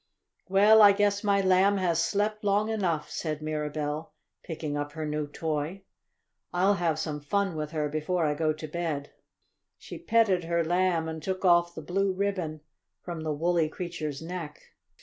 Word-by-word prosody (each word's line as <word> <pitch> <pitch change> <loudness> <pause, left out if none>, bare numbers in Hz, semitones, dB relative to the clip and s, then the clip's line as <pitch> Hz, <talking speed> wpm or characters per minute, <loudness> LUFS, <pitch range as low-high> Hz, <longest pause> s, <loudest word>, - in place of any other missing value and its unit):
"Well, 210 +3 +6
I 205 -1 +9
guess 205 0 +1
my 200 -1 +3
Lamb 190 +1 +4
has 170 -3 +1
slept 210 +3 -1
long 205 +2 +2
enough," 180 -8 -1
said 155 -3 -3
Mirabell, 150 0 -3 0.3
picking 155 -3 -5
up 145 0 -3
her 160 -1 -4
new 150 0 -2
toy. 155 +5 -3 0.7
"I'll 190 +3 +3
have 170 -5 0
some 150 -2 -3
fun 195 +4 -1
with 155 -1 -3
her 155 -1 -1
before 155 +3 -1
I 150 - +1
go 155 +1 +1
to 155 0 -6
bed." 155 -3 -3 0.7
She - - -9
petted 225 - +2
her 170 0 +1
Lamb, 175 -1 +1
and 160 0 -5
took 190 +3 -3
off 175 -1 +4
the 160 - -7
blue 195 +4 0
ribbon 185 -6 -2 0.4
from 170 -2 -5
the 155 -1 -2
woolly 165 +1 +1
creature's 160 -4 -5
neck. 165 -3 -6
170 Hz, 170 wpm, -28 LUFS, 155-195 Hz, 0.7 s, I